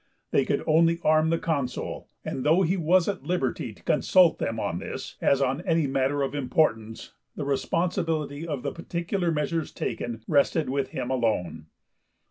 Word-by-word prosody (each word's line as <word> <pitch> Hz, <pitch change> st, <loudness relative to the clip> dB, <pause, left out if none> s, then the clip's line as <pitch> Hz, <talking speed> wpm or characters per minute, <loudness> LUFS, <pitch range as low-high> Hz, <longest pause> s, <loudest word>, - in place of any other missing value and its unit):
They -, -, +3 dB
could -, -, 0 dB
only 165 Hz, +2 st, +3 dB
arm 155 Hz, +1 st, +4 dB
the 165 Hz, -, +2 dB
Consul, 140 Hz, -7 st, -3 dB, 0.2 s
and 130 Hz, -, -3 dB
though 165 Hz, +5 st, +4 dB
he 180 Hz, +2 st, +1 dB
was 175 Hz, 0 st, +3 dB
at 200 Hz, -2 st, -2 dB
liberty 170 Hz, -9 st, -2 dB
to -, -, -18 dB
consult 180 Hz, -3 st, +4 dB
them 115 Hz, 0 st, -2 dB
on 90 Hz, -5 st, -2 dB
this, -, -, -7 dB
as 140 Hz, 0 st, +3 dB
on 135 Hz, +4 st, 0 dB
any 165 Hz, -4 st, +1 dB
matter 135 Hz, +1 st, 0 dB
of 135 Hz, -, -2 dB
importance, 120 Hz, -6 st, 0 dB, 0.2 s
the 145 Hz, -, -4 dB
responsibility 160 Hz, +1 st, -1 dB
of 145 Hz, -5 st, -4 dB
the -, -, -2 dB
particular 170 Hz, +1 st, -2 dB
measures 155 Hz, +1 st, -1 dB
taken 115 Hz, -2 st, -4 dB
rested 150 Hz, 0 st, +2 dB
with 135 Hz, -1 st, 0 dB
him 130 Hz, -1 st, -4 dB
alone. 110 Hz, -11 st, -1 dB
150 Hz, 165 wpm, -26 LUFS, 130-165 Hz, 0.2 s, arm